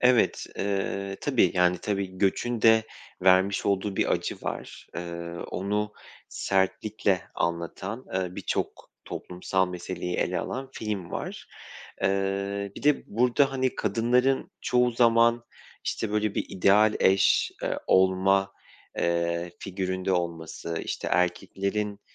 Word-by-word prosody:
Evet, 125 -2 +3
eee, 100 0 -2
tabii, - - +3
yani, 90 0 +3
tabii, 100 -2 -3
göçün 110 +4 0
de 110 -1 +6 0.4
vermiş 95 +1 +4
olduğu 100 0 0
bir - - +2
acı - - -1
var. - - -6
Eee, 85 -1 -5 0.2
onu 105 +2 -1 0.4
sertlikle 95 0 0
anlatan, 90 +7 -3
ııı, 90 -1 -2
birçok - - -3
toplumsal 90 +1 -2
meseleyi 90 0 -4
ele - - 0
alan 135 +1 -4
film 105 -7 -4
var. - - -5 0.5
Eee, 100 +1 0
bir - - -8
de 150 -1 +3
burada, 125 +5 +2
hani, 130 -1 0
kadınların 125 +3 +1
çoğu 125 0 +2
zaman, 115 0 +4 0.4
işte, 110 - -2
böyle 105 -1 0
bir - - -1
ideal 105 +3 +4
eş, 95 +1 +4
eee, - - -1
olma, 95 +1 +3 0.5
eee, 85 0 0
figüründe 95 0 -2
olması, 85 -1 -3
işte, - - -3
erkeklerin, 100 +3 0
100 Hz, 120 wpm, -27 LUFS, 90-110 Hz, 0.5 s, de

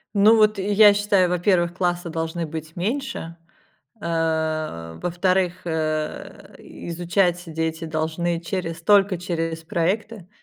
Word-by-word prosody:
Ну 215 +3 +6
вот 215 -1 +4
я 205 +1 +6
считаю, 200 -3 +2
во-первых, 175 -1 +1
классы 175 -1 -1
должны 165 0 -3
быть 160 0 -7
меньше, 195 -4 -3 0.7
а, 160 - -2
во-вторых, 180 +1 0
э, 155 -2 -3
изучать 175 +1 -1
дети 160 0 -3
должны 160 +2 -1
через 165 -2 -4
только 200 0 +4
через 165 -2 -3
проекты, 185 +4 -2
175 Hz, 110 wpm, -23 LUFS, 160-190 Hz, 0.7 s, Ну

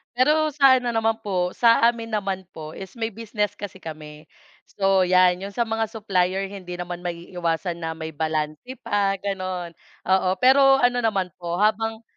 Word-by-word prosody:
pero 305 +5 +3
sa 270 -3 +6
ano 245 - -5
naman 225 0 +1
po, 180 -4 -1
sa 230 -1 +4
amin 230 -1 +2
naman 190 -3 -3
po 155 -1 -8
is 190 +6 -10
may 225 -1 -3
business 210 -1 -3
kasi 195 -2 -7
kami. 155 -1 -9 0.4
So 195 -1 +1
yan 180 0 +4
yung 200 - -5
sa 235 +2 -1
mga 225 -1 -1
supplier, 195 -3 0
hindi 180 -3 -8
naman 175 0 -6
maiiwasan 170 0 -3
na 160 0 -3
may 160 -1 -7
balanse 155 - -3
pa, 200 -3 0
gano'n. 185 -3 -4 0.3
Oo, 190 -1 +3
pero 270 +1 +6
ano 245 0 +2
naman 195 -5 +1
po 175 +1 -4
habang 220 +1 0
195 Hz, 170 wpm, -23 LUFS, 175-225 Hz, 0.4 s, sa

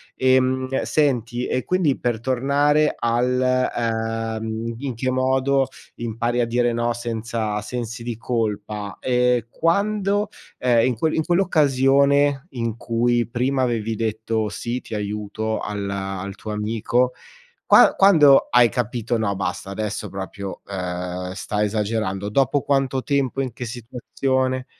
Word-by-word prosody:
Ehm, 130 0 +2
senti, 125 -5 0
e 130 - -1
quindi 180 -7 +1
per 120 -2 -1
tornare 140 +5 +2
al, 125 +2 +1 0.7
uhm, 110 +1 -3
in 135 -2 -4
che 130 +3 -1
modo 130 +1 +2 0.3
impari 120 +1 -2
a - - +2
dire 120 0 +1
no 120 0 0
senza 115 -2 -3
sensi 120 +1 -5
di 115 -2 -4
colpa, 105 -3 -3
ehm, 125 -2 +2
quando, 200 - +1 0.3
ehm, 120 -1 +3
in 125 - 0
que 155 +8 0
in 160 - +1
quell'occasione 140 -4 +3
in 115 -4 -3
cui 120 0 +1
prima 130 +3 0
avevi 115 -2 -1
detto: 110 0 -1
“Sì, 120 +4 -4
ti - - -7
aiuto”, 105 +1 -3
al 105 -1 -4
al 95 0 -4
tuo 110 - -9
amico 115 +4 0 0.5
qua - - +6
quando 155 -8 +6
hai 120 -1 +6
capito: 120 0 -2
“No, 100 -2 -1
basta, 95 0 -4
adesso 105 0 -4
proprio, 95 0 -6
uhm, 90 -1 -4
sta 105 +2 -2
esagerando”? 105 -2 -1
Dopo 135 +4 +2
quanto 135 -2 0
tempo, 135 -2 0
in 130 -2 -3
che 125 - -6
situazione? 130 +2 -2
120 Hz, 135 wpm, -22 LUFS, 110-130 Hz, 0.7 s, qua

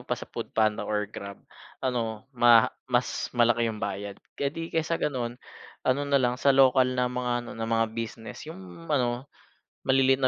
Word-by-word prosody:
pa - - -2
sa - - -7
Foodpanda 110 -1 0
or 105 -1 0
Grab 100 -1 -8 0.5
ano 115 -4 -1
maha 120 -2 +6 0.2
mas 125 0 0
malaki 120 -1 +4
yung 110 - -4
bayad. 100 -1 -4 0.2
Eh, 140 - +2
di 165 +3 -6
kaysa 165 +1 +1
ganun, 125 -4 -2 0.5
ano 130 +2 +2
nalang 125 -3 +2
sa 140 -1 +4
lokal 130 -1 +5
na 125 - +2
mga 125 0 -1
ano - - -8
na 115 0 -4
mga 115 -1 +1
business 115 +4 -6
yung 95 - -10
ano 125 -3 0 0.6
maliliit 135 0 +4
na 130 - +4
120 Hz, 170 wpm, -27 LUFS, 110-130 Hz, 0.6 s, maha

